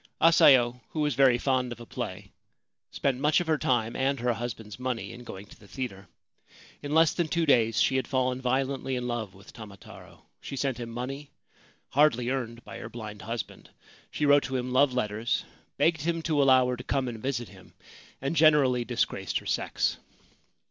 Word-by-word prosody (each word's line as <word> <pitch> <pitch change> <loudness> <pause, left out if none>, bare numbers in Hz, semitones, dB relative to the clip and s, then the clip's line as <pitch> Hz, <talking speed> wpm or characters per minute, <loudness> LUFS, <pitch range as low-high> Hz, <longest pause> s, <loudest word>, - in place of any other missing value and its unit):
Asayo, 130 -7 +5
who 155 - -3
was 150 -1 +1
very 130 -1 +4
fond 130 -1 0
of 120 - -7
a 120 - -9
play, 100 -5 -6 0.6
spent 135 -2 -1
much 150 +1 +3
of 175 - -2
her 160 -2 +1
time 115 -3 0
and 135 0 0
her 120 0 +1
husband's 115 -2 -6
money 125 -2 -3
in 125 - -10
going 100 -4 -9
to - - -17
the 100 - -17
theatre. 100 -6 -6 0.7
In 145 +1 -3
less 160 0 +5
than 170 -2 -1
two 170 +1 0
days 115 -6 +3
she 130 - +3
had 130 - -2
fallen 130 -1 0
violently 130 +1 -1
in 125 -1 -3
love 110 -5 -4
with 95 +1 -15
Tamataro. 105 -4 -13 0.2
She - - -7
sent 135 -2 -2
him 120 -1 -5
money, 135 +5 -6 0.6
hardly 130 -4 +3
earned 120 -3 -4
by - - -9
her - - -7
blind 105 -3 -8
husband. 115 +1 -6 0.4
She 150 - -2
wrote 145 0 +6
to 135 - -4
him 125 0 -2
love 135 +1 +4
letters, 115 -2 -1 0.3
begged 160 -2 +2
him 165 +1 -1
to 155 -3 +1
allow 130 -2 +5
her 125 - -2
to 125 - -8
come 135 -2 -1
and 115 -3 -6
visit 125 -3 -3
him, - - -17 0.5
and 135 +5 -2
generally 145 -6 +4
disgraced 115 -6 -1
her - - -7
sex. - - -1
125 Hz, 190 wpm, -28 LUFS, 115-140 Hz, 0.7 s, wrote